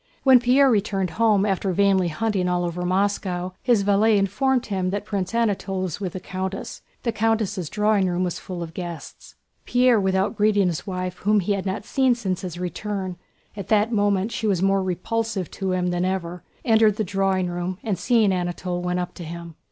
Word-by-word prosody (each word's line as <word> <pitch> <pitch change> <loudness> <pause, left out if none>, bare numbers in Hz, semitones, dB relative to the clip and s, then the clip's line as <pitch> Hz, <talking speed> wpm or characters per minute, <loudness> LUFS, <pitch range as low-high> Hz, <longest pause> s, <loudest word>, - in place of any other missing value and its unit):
When 265 -2 +7
Pierre 255 +3 +4
returned 195 -4 0
home 215 -2 +3
after 195 -1 0
vainly 195 -1 +3
hunting 185 +2 -1
all 175 0 0
over 175 +1 -4
Moscow, 185 -1 -1
his 235 -5 +3
valet 205 +2 +4
informed 250 +6 +1
him 190 -3 -1
that 205 +2 -3
Prince 195 0 -3
Anatole 200 -4 0
was 185 -1 -4
with 185 -4 -4
the 185 - -4
countess. 190 +1 -5 0.2
The 235 - 0
countess' 215 -6 0
drawing 210 -2 +2
room 175 +1 0
was 175 -2 -2
full 180 -2 -6
of 165 -1 -9
guests. 170 -4 -8 0.3
Pierre 245 -2 +4
without 190 +2 +1
greeting 205 -1 +3
his 165 +2 -5
wife 185 -1 -4
whom 210 +1 +2
he 195 +2 -1
had 195 -1 -3
not 190 +2 -3
seen 260 -1 +2
since 190 -6 -3
his 180 -3 -6
return—at 190 +1 -6
that 215 +1 +2
moment 205 -1 +1
she 225 -3 -2
was 195 -4 +2
more 195 0 +3
repulsive 190 +1 -2
to 190 -1 -3
him 180 -1 0
than 175 0 -1
ever—entered 190 +4 0
the 215 - -1
drawing 195 -1 0
room 175 +1 -3
and 205 -7 -2
seeing 220 0 +3
Anatole 175 0 -2
went 180 0 -1
up 180 - -4
to 175 - -9
him. 170 0 -8
195 Hz, 190 wpm, -23 LUFS, 180-215 Hz, 0.3 s, When